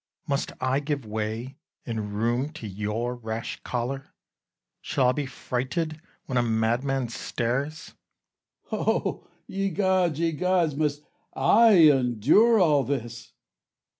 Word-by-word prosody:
Must 140 Hz, -2 st, -1 dB
I 130 Hz, +1 st, +1 dB
give 145 Hz, -3 st, -3 dB
way 110 Hz, +5 st, -4 dB, 0.3 s
and 110 Hz, -3 st, -4 dB
room 120 Hz, +6 st, 0 dB
to 155 Hz, -8 st, -8 dB
your 105 Hz, +5 st, -3 dB
rash 115 Hz, -1 st, -5 dB
choler? 130 Hz, +3 st, -4 dB, 0.7 s
Shall 125 Hz, -2 st, +1 dB
I -, -, +5 dB
be 140 Hz, +1 st, -3 dB
frighted 145 Hz, +5 st, -3 dB, 0.2 s
when 130 Hz, -2 st, 0 dB
a -, -, +4 dB
madman 120 Hz, +3 st, 0 dB
stares? 135 Hz, +8 st, -3 dB, 0.8 s
Cas. -, -, -1 dB
O -, -, -1 dB, 0.2 s
ye 195 Hz, 0 st, -2 dB
gods, 185 Hz, -4 st, +1 dB
ye 165 Hz, 0 st, +1 dB
gods! 175 Hz, -2 st, +1 dB
must 150 Hz, -1 st, -1 dB, 0.3 s
I 215 Hz, +12 st, +5 dB, 0.2 s
endure 135 Hz, -, +4 dB
all 150 Hz, -6 st, +4 dB
this? 120 Hz, -4 st, -5 dB
135 Hz, 125 wpm, -26 LUFS, 120-155 Hz, 0.8 s, I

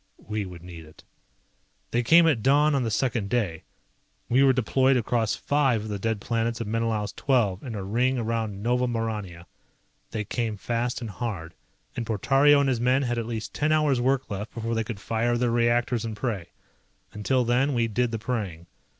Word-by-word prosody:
We 105 Hz, -2 st, -3 dB
would 85 Hz, -2 st, -11 dB
need 85 Hz, -2 st, -10 dB
it. 80 Hz, -, -17 dB, 0.9 s
They 120 Hz, -, +2 dB
came 165 Hz, +8 st, +6 dB
at 140 Hz, -9 st, +2 dB
dawn 145 Hz, +5 st, +4 dB
on 140 Hz, -, +2 dB
the 115 Hz, -, -1 dB
second 110 Hz, -2 st, -1 dB
day. 100 Hz, -9 st, -1 dB, 0.7 s
We 125 Hz, +3 st, +4 dB
were 135 Hz, -1 st, +6 dB
deployed 130 Hz, +2 st, +2 dB
across 115 Hz, -1 st, 0 dB
five 135 Hz, -7 st, +1 dB
of 110 Hz, -, -6 dB
the 100 Hz, -1 st, -3 dB
dead 110 Hz, +1 st, -1 dB
planets 115 Hz, +1 st, -1 dB
of 115 Hz, -, -3 dB
Menelaus 110 Hz, -1 st, -1 dB
XII 115 Hz, -9 st, +1 dB
in 120 Hz, -5 st, -6 dB
a 100 Hz, -, -4 dB
ring 125 Hz, +6 st, +1 dB
around 110 Hz, -3 st, -2 dB
Nova 125 Hz, +2 st, +1 dB
Maurania. 105 Hz, -7 st, -4 dB, 0.6 s
They 110 Hz, -, -3 dB
came 110 Hz, 0 st, -3 dB
fast 120 Hz, +4 st, -2 dB
and 115 Hz, -, -5 dB
hard, 90 Hz, -5 st, -5 dB, 0.4 s
and 120 Hz, -, -2 dB
Portario 135 Hz, +7 st, +4 dB
and 140 Hz, -, +1 dB
his 125 Hz, -3 st, 0 dB
men 130 Hz, +3 st, +3 dB
had 120 Hz, -2 st, -1 dB
at 115 Hz, -, -4 dB
least 110 Hz, -2 st, -5 dB
ten 150 Hz, +1 st, 0 dB
hours 150 Hz, -5 st, +2 dB
work 135 Hz, +1 st, +1 dB
left 105 Hz, +4 st, -5 dB
before 115 Hz, 0 st, -2 dB
they 115 Hz, 0 st, 0 dB
could 110 Hz, -2 st, -6 dB
fire 115 Hz, +3 st, 0 dB
their 120 Hz, -1 st, +1 dB
reactors 120 Hz, 0 st, +1 dB
and 110 Hz, -2 st, -5 dB
pray. 105 Hz, -8 st, -3 dB, 0.6 s
Until 125 Hz, +4 st, +1 dB
then 130 Hz, +4 st, +2 dB
we 115 Hz, -1 st, +2 dB
did 120 Hz, +3 st, 0 dB
the 115 Hz, -, -3 dB
praying. 105 Hz, -7 st, -4 dB
115 Hz, 195 wpm, -26 LUFS, 105-125 Hz, 0.9 s, came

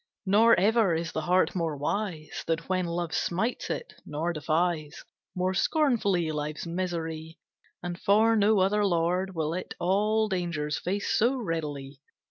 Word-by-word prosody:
Nor 215 Hz, +2 st, +5 dB
ever 210 Hz, -2 st, +3 dB
is 165 Hz, 0 st, -3 dB
the 160 Hz, -, -2 dB
heart 180 Hz, +3 st, +2 dB
more 165 Hz, -5 st, -2 dB
wise 160 Hz, +1 st, -3 dB
Than 165 Hz, -, +2 dB
when 185 Hz, -1 st, 0 dB
Love 170 Hz, -1 st, -3 dB
smites 220 Hz, +8 st, -1 dB
it, -, -, -4 dB
nor 160 Hz, +4 st, -2 dB
defies 155 Hz, 0 st, -1 dB, 0.3 s
More 185 Hz, +1 st, 0 dB
scornfully 200 Hz, -, +1 dB
life's 150 Hz, +1 st, -4 dB
misery, 165 Hz, -2 st, -4 dB, 0.5 s
And 175 Hz, 0 st, -4 dB
for 220 Hz, +3 st, +4 dB
no 210 Hz, -1 st, +4 dB
other 205 Hz, +2 st, +2 dB
lord 180 Hz, +1 st, 0 dB
Will 160 Hz, -1 st, -1 dB
it 185 Hz, -, -5 dB
all 210 Hz, +4 st, +2 dB
dangers 170 Hz, -6 st, -2 dB
face 200 Hz, +3 st, -2 dB
so 240 Hz, +5 st, +3 dB
readily. 150 Hz, -, -4 dB
175 Hz, 145 wpm, -28 LUFS, 160-200 Hz, 0.5 s, Nor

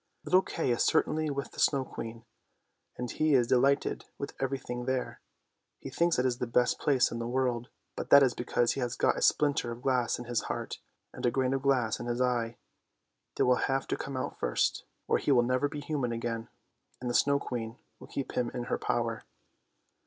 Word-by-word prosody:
" -, -, -48 dB
Little 185 Hz, +1 st, +5 dB
Kay 165 Hz, -8 st, -2 dB
is 120 Hz, -, +1 dB
certainly 155 Hz, 0 st, +2 dB
with 140 Hz, -1 st, -4 dB
the -, -, -11 dB
Snow 135 Hz, -2 st, +3 dB
Queen, 115 Hz, -1 st, -7 dB, 0.7 s
and 125 Hz, -1 st, -4 dB
he 155 Hz, -2 st, +2 dB
is 125 Hz, -2 st, +4 dB
delighted 135 Hz, +3 st, +2 dB
with 140 Hz, -, -5 dB
everything 130 Hz, -2 st, -3 dB
there. 130 Hz, -1 st, -2 dB, 0.6 s
He -, -, -8 dB
thinks 170 Hz, 0 st, +2 dB
it 125 Hz, -, +2 dB
is 125 Hz, -1 st, 0 dB
the 125 Hz, -, -2 dB
best 125 Hz, +1 st, +2 dB
place 135 Hz, -4 st, +3 dB
in 115 Hz, -, -4 dB
the 115 Hz, -, -3 dB
world, 125 Hz, -1 st, 0 dB, 0.3 s
but -, -, -5 dB
that 140 Hz, 0 st, +9 dB
is 130 Hz, -3 st, +3 dB
because 120 Hz, 0 st, +1 dB
he -, -, -3 dB
has 125 Hz, -1 st, -2 dB
got -, -, +2 dB
a -, -, -4 dB
splinter 145 Hz, -5 st, +2 dB
of 120 Hz, +2 st, -8 dB
glass 125 Hz, -3 st, +1 dB
in 120 Hz, -, -7 dB
his 120 Hz, -1 st, 0 dB
heart -, -, -4 dB, 0.3 s
and -, -, -9 dB
a 120 Hz, -, +4 dB
grain 130 Hz, +1 st, 0 dB
of 135 Hz, -, -1 dB
glass 130 Hz, -5 st, +1 dB
in -, -, -5 dB
his 120 Hz, 0 st, -1 dB
eye. 120 Hz, -2 st, 0 dB, 0.8 s
They -, -, +2 dB
will 125 Hz, 0 st, +4 dB
have 135 Hz, 0 st, 0 dB
to -, -, +1 dB
come 135 Hz, -1 st, -5 dB
out 130 Hz, -, -4 dB
first, -, -, 0 dB, 0.2 s
or -, -, +2 dB
he -, -, 0 dB
will 125 Hz, -3 st, +5 dB
never 130 Hz, +4 st, +1 dB
be 145 Hz, 0 st, -6 dB
human 145 Hz, -5 st, -2 dB
again, 115 Hz, -1 st, -3 dB, 0.5 s
and 125 Hz, -, -5 dB
the 120 Hz, -, -1 dB
Snow 140 Hz, +3 st, +4 dB
Queen 115 Hz, -3 st, -5 dB, 0.2 s
will -, -, -12 dB
keep 140 Hz, -, -4 dB
him 120 Hz, -1 st, 0 dB
in 125 Hz, -, -2 dB
her 120 Hz, -, -2 dB
power! 115 Hz, -1 st, -1 dB
125 Hz, 215 wpm, -30 LUFS, 120-135 Hz, 0.8 s, that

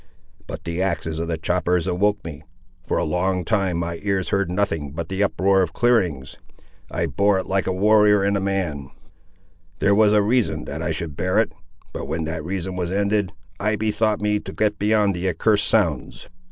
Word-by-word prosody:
But -, -, -7 dB
the 85 Hz, +2 st, -3 dB
axes 80 Hz, -4 st, -2 dB
of 85 Hz, -, -2 dB
the 85 Hz, -1 st, -2 dB
choppers 90 Hz, +1 st, 0 dB
awoke 100 Hz, +2 st, 0 dB
me. 75 Hz, -4 st, -7 dB, 0.5 s
For -, -, 0 dB
a -, -, +1 dB
long 90 Hz, 0 st, 0 dB
time 95 Hz, -5 st, 0 dB
my 85 Hz, 0 st, -3 dB
ears 100 Hz, -2 st, -1 dB
heard 100 Hz, -2 st, 0 dB
nothing 80 Hz, -7 st, -1 dB
but 80 Hz, +1 st, -5 dB
the 95 Hz, +1 st, -2 dB
uproar 95 Hz, -1 st, +3 dB
of 90 Hz, -, -1 dB
clearings. 90 Hz, -, +1 dB, 0.5 s
I 85 Hz, -, -1 dB
bore 100 Hz, +6 st, +2 dB
it 95 Hz, -, -2 dB
like 95 Hz, 0 st, -1 dB
a -, -, +1 dB
warrior 105 Hz, +1 st, +4 dB
and 100 Hz, +1 st, +1 dB
a -, -, +1 dB
man; 90 Hz, -9 st, -2 dB, 0.9 s
there 100 Hz, -, +3 dB
was 105 Hz, 0 st, +5 dB
a 105 Hz, -1 st, +4 dB
reason 120 Hz, +2 st, +1 dB
that 80 Hz, -, -5 dB
I 85 Hz, -, -2 dB
should 80 Hz, -1 st, -4 dB
bear 90 Hz, +3 st, 0 dB
it: 110 Hz, -6 st, +2 dB, 0.4 s
but -, -, -5 dB
when 80 Hz, 0 st, -2 dB
that 80 Hz, 0 st, -4 dB
reason 95 Hz, +1 st, -3 dB
was 90 Hz, -1 st, -2 dB
ended, 100 Hz, -1 st, 0 dB, 0.3 s
I 105 Hz, +2 st, +1 dB
bethought 110 Hz, 0 st, 0 dB
me 105 Hz, 0 st, +1 dB
to -, -, -8 dB
get 105 Hz, -1 st, 0 dB
beyond 105 Hz, -1 st, +2 dB
the 90 Hz, +1 st, -1 dB
accursed 105 Hz, +5 st, +1 dB
sounds. 85 Hz, -, 0 dB
95 Hz, 195 wpm, -22 LUFS, 85-105 Hz, 0.9 s, was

